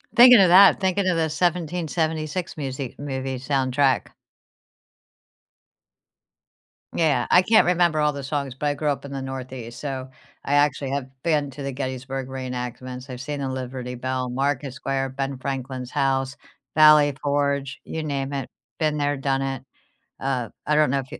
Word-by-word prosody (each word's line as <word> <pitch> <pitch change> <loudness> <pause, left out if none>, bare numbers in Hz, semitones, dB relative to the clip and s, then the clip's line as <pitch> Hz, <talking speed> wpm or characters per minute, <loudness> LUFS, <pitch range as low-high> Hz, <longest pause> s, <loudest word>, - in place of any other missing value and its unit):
Thinking 245 -2 +9
of 185 -3 +6
that, 190 +2 +8
thinking 190 +1 +1
of 175 -2 +2
the 165 - +2
1776 165 -1 -1
musi 135 -3 -5
movie 135 -2 -4
soundtrack. 135 0 +1 2.9
Yeah, 145 -7 +2
I 180 - +7
can't 220 +3 +5
remember 175 -3 +2
all 150 -1 +2
the 140 -1 -6
songs, 140 -2 -3
but 145 +2 -2
I 145 - +2
grew 150 +1 -3
up 140 -1 0
in 140 - -8
the 135 -1 -4
Northeast, 130 -3 -7
so 135 -2 -5 0.4
I 140 - -1
actually 145 -2 +2
have 140 -2 -3
been 150 -4 0
to 140 +2 -8
the 135 -1 -3
Gettysburg 130 0 -4
reenactments. 125 0 -6
I've 125 -1 -7
seen 145 +1 -4
the 135 - -2
Liberty 125 -1 -5
Bell, 130 0 -3
Market 135 +1 -1
Square, 135 -1 -2
Ben 135 0 -4
Franklin's 130 -1 -5
house, 135 -1 0 0.4
Valley 150 -2 +7
Forge, 140 -1 -1
you 160 - -5
name 140 -2 -3
it, 135 -3 -4 0.3
been 155 -1 +1
there, 145 0 0
done 135 0 0
it. 135 -1 -3 0.6
Uh, 130 -4 -2 0.2
I 150 - +2
don't 150 -3 +4
know 140 +1 +1
if 130 - -8
you - - -8
140 Hz, 165 wpm, -24 LUFS, 130-150 Hz, 2.9 s, Thinking